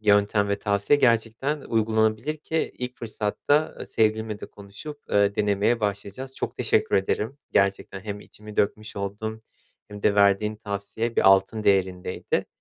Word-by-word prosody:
yöntem 100 -1 +3
ve 100 0 0
tavsiye 100 +8 +2
gerçekten 120 +5 +1
uygulanabilir 110 +5 +1
ki 160 +1 -2
ilk 125 0 -5
fırsatta, 115 +7 0
ııı, - - -7
sevgilimle 110 -1 0
de - - -6
konuşup, 105 +9 -10
ııı, 100 0 +3
denemeye 105 +3 +2
başlayacağız. 105 +6 -3
Çok - - -4
teşekkür - - +2
ederim 110 +7 -1
gerçekten, 100 0 +1
hem 105 0 -6
içimi 105 0 -13
dökmüş 110 +1 -1
oldum 105 +3 -4 0.5
hem 105 0 -10
de 105 - +3
verdiğin 100 +1 +3
tavsiye 105 +2 -4
bir - - +6
altın 95 +3 +4
değerindeydi. 95 -2 0
105 Hz, 145 wpm, -25 LUFS, 100-115 Hz, 0.5 s, bir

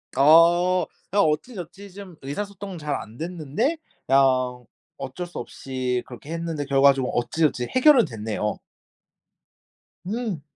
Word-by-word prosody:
아 170 +5 +5 0.3
그냥 200 0 +4
어찌저찌 190 +3 -4
좀 195 -3 -10
의사소통은 195 +6 -6
잘 150 -1 -2
안됐는데 165 - -3 0.3
그냥 130 -2 +2 0.3
어쩔 175 +7 -6
수 175 - -11
없이 125 0 -3
그렇게 130 +5 -10
했는데 165 -3 -3
결과적으로 135 -1 +3
어찌저찌 125 +1 0
해결은 255 - +6
됐네요. 105 -4 -3 1.5
음. 215 - -3
155 Hz, 265 characters per minute, -24 LUFS, 130-185 Hz, 1.5 s, 해결은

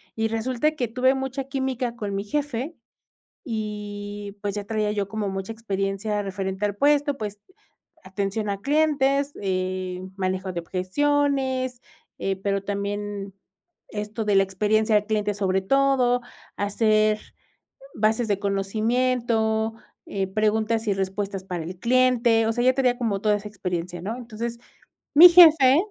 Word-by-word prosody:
y 225 0 0
resulta 240 +6 0
que 255 -6 -2
tuve 255 +3 +2
mucha 265 0 -3
química 265 -3 -2
con 205 -4 -4
mi 200 - -2
jefe 290 +5 -3 0.7
y, 205 -3 -5
pues, 205 -1 -3
ya 205 - -3
traía 215 0 -1
yo 200 -2 -1
como 210 -1 -3
mucha 195 +2 -4
experiencia 205 -1 -2
referente 195 0 -3
al 205 -1 -2
puesto, 285 +2 +2
pues, 210 -1 -5 0.6
atención 200 +2 -3
a 200 0 -3
clientes, 285 -1 +2
eh, 185 -1 -2 0.2
manejo 185 0 -2
de 170 - -3
objeciones, 260 - 0 0.4
eh, 195 0 -1
pero 195 0 -1
también 200 -1 -4 0.5
esto 215 +1 -4
de 210 - +1
la 195 - +6
experiencia 215 +3 +1
al 210 0 +3
cliente, 210 -1 -1
sobre 190 -1 0
todo 255 +1 +2 0.4
hacer 215 +1 +2 0.8
bases 220 +2 +1
de 200 -2 +1
conocimiento, 220 +2 0 0.3
eh, 195 -1 -2
preguntas 215 +2 0
y 200 - +2
respuestas 195 0 -3
para 180 -3 -4
el 180 +2 -7
cliente, 240 -1 +3
o 225 - +1
sea, 240 - 0
ya 255 - +6
tenía 250 -2 +2
como 215 -5 -1
toda 210 0 +2
esa 205 +1 -7
experiencia, 180 -4 -4
¿no? 215 +5 -3
Entonces, 235 -1 -5 0.6
mi 350 +4 +11
jefe 315 -6 +8
215 Hz, 145 wpm, -24 LUFS, 200-250 Hz, 0.8 s, mi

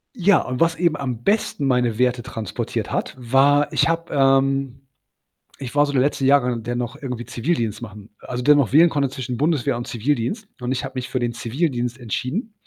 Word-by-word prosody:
Ja, 200 -1 +4
und 125 0 -4
was 165 0 +3
eben 170 -3 +1
am 125 -4 -4
besten 200 -8 0
meine 125 -4 +1
Werte 125 -1 +1
transportiert 115 -5 -4
hat, - - -2
war 140 +4 +3
ich - - +2
habe, 165 0 -2
ähm 135 -1 +2 0.8
ich 130 0 -7
war 145 0 +5
so 145 - -4
der 130 - +3
letzte 140 -1 0
Jahrgang, 125 -4 +3
der 120 +1 -3
noch 120 +1 -3
irgendwie 125 -3 -5
Zivildienst 120 -5 -2
machen 105 -2 -10
also, 125 0 -5
der 150 +3 +6
noch 135 -5 +1
wählen 165 +4 +7
konnte 140 -3 0
zwischen 125 -2 -5
Bundeswehr 145 -5 +1
und 120 - -6
Zivildienst. 140 - -2
Und 125 0 -3
ich 130 - -1
habe - - -6
mich 130 -1 -4
für 130 - -1
den 120 -1 -1
Zivildienst 120 0 -2
entschieden. 135 - -3
130 Hz, 200 wpm, -22 LUFS, 120-145 Hz, 0.8 s, wählen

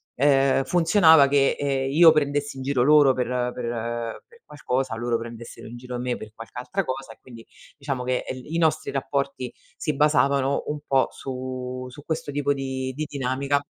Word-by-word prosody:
ehm, 135 0 +3
funzionava 165 -4 +5
che, 140 -1 +3
ehm, 135 -1 -1
io 160 +3 +8
prendessi 145 -2 -1
in 130 - -6
giro 130 -2 +1
loro 145 -1 +6
per 125 -1 -2 0.3
per 120 -1 -4
per 470 +1 -21
qualcosa, 130 -4 -2
loro 120 +1 -1
prendessero 115 0 -9
in 115 - -9
giro 125 0 -6
me 125 0 -2
per 110 - -10
qualche 115 +2 -11
altra 190 +10 -2
cosa 130 -3 -5
e - - -26
quindi 115 -3 -13 0.3
diciamo 140 -3 -3
che 125 0 -1
il 130 +4 -8
i - - +1
nostri 155 -1 +1
rapporti 140 -2 -2 0.3
si 150 - -2
basavano 140 -1 +2
un 150 0 -3
po' 135 -1 +3
su 130 -1 -6
su 135 +3 -13
questo 160 -2 -3
tipo 145 0 0
di 130 -1 -4
di 155 +2 -3
dinamica. 140 +1 -1
135 Hz, 180 wpm, -24 LUFS, 125-145 Hz, 0.3 s, io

